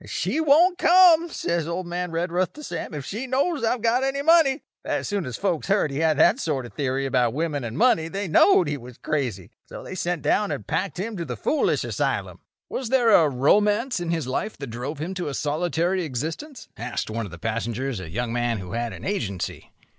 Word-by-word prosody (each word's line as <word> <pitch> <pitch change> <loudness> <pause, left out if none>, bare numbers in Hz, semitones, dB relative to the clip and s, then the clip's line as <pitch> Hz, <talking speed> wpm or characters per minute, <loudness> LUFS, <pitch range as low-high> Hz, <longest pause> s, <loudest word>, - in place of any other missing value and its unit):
'She - - -2
won't 320 +4 +4
come,' 345 -1 +6
says 170 - -2
old 175 +2 -3
man 175 +1 -3
Redruth 175 +2 -1
to 300 - -11
Sam, 160 - -5
'if 140 -2 -5
she 230 - -5
knows 275 +2 0
I've 230 0 0
got 240 +3 +2
any 275 +1 -1
money.' 315 -3 +4 0.2
"As - - -2
soon 200 -7 -2
as 125 - -5
folks 180 -6 -1
heard 195 -7 +2
he 135 - -3
had 160 -2 +2
that 210 - +5
sort 145 - -2
of 120 - -10
a - - -32
theory 135 -1 -1
about 125 -2 +1
women 150 -3 -1
and 115 +2 -5
money 195 -9 +3
they 195 +3 -4
knowed 180 - +5
he 145 0 -2
was 125 -1 -12
crazy; 125 - -3 0.2
so - - -9
they - - -8
sent 175 -4 -2
down 200 +7 +1
and - - -4
packed 185 -7 -2
him 220 +3 -3
to 170 - -3
the 125 -7 -5
foolish 305 - +1
asylum." - - -2 0.3
"Was 255 -4 -4
there 245 -3 +4
a 165 -7 +6
romance 210 - +2
in 175 -1 -4
his 165 -4 -1
life 210 +12 -3
that 140 -4 -7
drove 130 +6 -5
him 165 +6 -4
to 180 -3 -4
a 140 - -3
solitary 170 +4 0
existence?" 160 - -5
asked 120 -1 -4
one 115 0 -3
of - - -13
the 90 - -9
passengers, 115 +4 -3
a 85 -4 -8
young 115 +6 -3
man 120 -1 0
who 90 -3 -7
had 120 0 -2
an - - -9
Agency. 105 - -3
165 Hz, 220 wpm, -24 LUFS, 130-220 Hz, 0.3 s, come